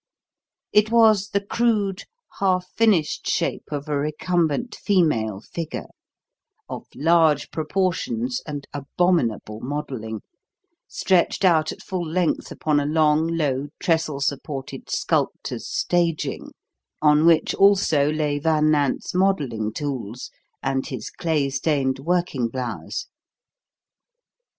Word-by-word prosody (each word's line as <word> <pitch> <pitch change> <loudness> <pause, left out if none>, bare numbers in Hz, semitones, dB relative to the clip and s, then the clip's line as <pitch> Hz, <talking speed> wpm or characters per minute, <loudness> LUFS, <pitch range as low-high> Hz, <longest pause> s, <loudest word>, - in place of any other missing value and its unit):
It 210 +1 +4
was 220 -3 +4
the 200 -1 -1
crude, 210 -4 0 0.3
half 185 -2 +1
finished 205 -9 +2
shape - - -1
of 145 0 -4
a 150 - -1
recumbent 160 - 0
female 115 - +1
figure, 165 +7 -6 0.8
of - - -7
large 160 -1 +3
proportions 155 -8 -1
and 145 -2 -5
abominable 140 - 0
modelling, 125 -5 -5 0.7
stretched 185 +1 +1
out 160 -3 +4
at - - -10
full 185 -2 -3
length 170 +1 -1
upon 150 -2 +1
a 145 - -1
long, 155 0 +3
low, 145 -5 -1
trestle 160 -5 0
supported 140 -1 -4
"sculptor's - - -1
staging," 170 -3 -1 0.5
on 150 0 +4
which 165 -2 +4
also 185 -8 +4
lay 150 -2 0
Van 155 0 +2
Nant's 145 -3 0
modelling 145 - +1
tools 125 -4 -5 0.3
and 135 0 -1
his - - -6
clay 155 -4 0
stained 135 -1 0
working 170 -5 0
blouse. 125 +1 -4
155 Hz, 110 wpm, -23 LUFS, 140-180 Hz, 0.8 s, It